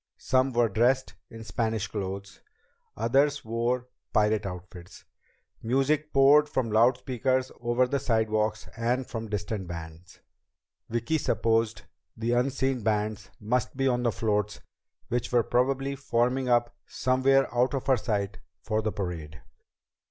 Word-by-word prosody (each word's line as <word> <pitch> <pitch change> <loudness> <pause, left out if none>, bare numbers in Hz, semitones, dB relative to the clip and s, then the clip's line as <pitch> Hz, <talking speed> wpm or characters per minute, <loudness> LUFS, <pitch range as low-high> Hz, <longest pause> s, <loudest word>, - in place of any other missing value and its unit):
Some 130 +1 +1
were 120 -1 +3
dressed 120 +6 +1 0.2
in 115 0 -10
Spanish 110 -2 -1
clothes, 100 -1 -6 0.6
others 140 +6 +2
wore 120 +2 -1 0.2
pirate 105 -1 +2
outfits. 90 -1 -10 0.6
Music 135 +6 +1
poured 145 +2 +6
from 120 -6 -1
loud 120 +4 +4
speakers 130 +1 -1
over 120 +1 +2
the 140 +2 -1
sidewalks 110 -3 0
and 120 +3 0
from 115 -2 -6
distant 105 -2 -3
bands. 85 +1 -9 0.7
Vicki 120 +7 0
supposed 115 -4 0 0.3
the 115 +1 -1
unseen 130 +1 +1
bands 105 -1 -1
must 120 +4 -1
be 135 -1 +2
on 125 -1 +1
the 120 -1 +1
floats 105 -2 -1 0.5
which 120 0 -1
were 120 -2 +4
probably 135 +4 0
forming 125 -1 0
up 120 -1 +2
somewhere 130 +2 +2
out 125 +3 +2
of 135 - -3
her 135 -1 +4
sight 105 -3 -2 0.2
for 110 0 0
the 110 0 -1
parade. 85 -7 -5
115 Hz, 135 wpm, -27 LUFS, 105-130 Hz, 0.7 s, poured